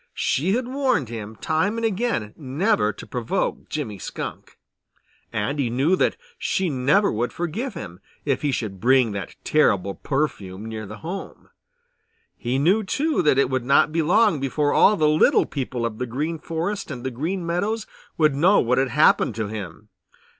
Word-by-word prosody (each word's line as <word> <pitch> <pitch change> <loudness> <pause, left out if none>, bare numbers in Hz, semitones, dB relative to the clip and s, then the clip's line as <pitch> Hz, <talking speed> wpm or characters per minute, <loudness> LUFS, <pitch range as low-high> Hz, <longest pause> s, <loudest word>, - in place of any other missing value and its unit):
She 170 +8 +1
had 250 0 -2
warned 255 - 0
him 110 -2 -6
time 160 - 0
and 230 - -1
again 210 - -1
never 145 - +1
to - - -11
provoke 125 +10 -2
Jimmy 115 -10 -4
Skunk, - - -7 0.7
and 110 +8 -2
he 130 -4 +1
knew 135 +10 +2
that - - +1 0.2
she 190 - 0
never 145 +11 +3
would 120 +3 -1
forgive 195 - -4
him 85 -2 -8 0.3
if - - 0
he 145 - +1
should 105 -7 -3
bring 125 -1 +4
that 100 -3 -6
terrible 100 -10 +2
perfume 105 -7 -3
near 110 -2 -6
their 105 +2 -8
home. 180 +4 -7 0.9
He 125 +2 -2
knew, 185 +10 +3
too, 300 +10 0
that 150 -5 +3
it 135 -1 +2
would 130 -2 0
not 140 +4 +4
be 165 +1 +1
long 195 +1 +3
before 145 +2 0
all 210 - +5
the 155 - +3
little 155 +1 +4
people 125 -4 -3
of 110 -2 -4
the 125 - -2
Green 150 +7 -3
Forest 170 +7 -3
and 125 -4 -6
the 130 - -2
Green 170 +9 -3
Meadows 200 +6 -1 0.3
would 155 -3 +4
know 175 +9 +4
what 125 +2 +2
had 135 -1 +1
happened 125 -4 +3
to 110 -2 -3
him. 105 -1 -7
140 Hz, 175 wpm, -23 LUFS, 115-180 Hz, 0.9 s, all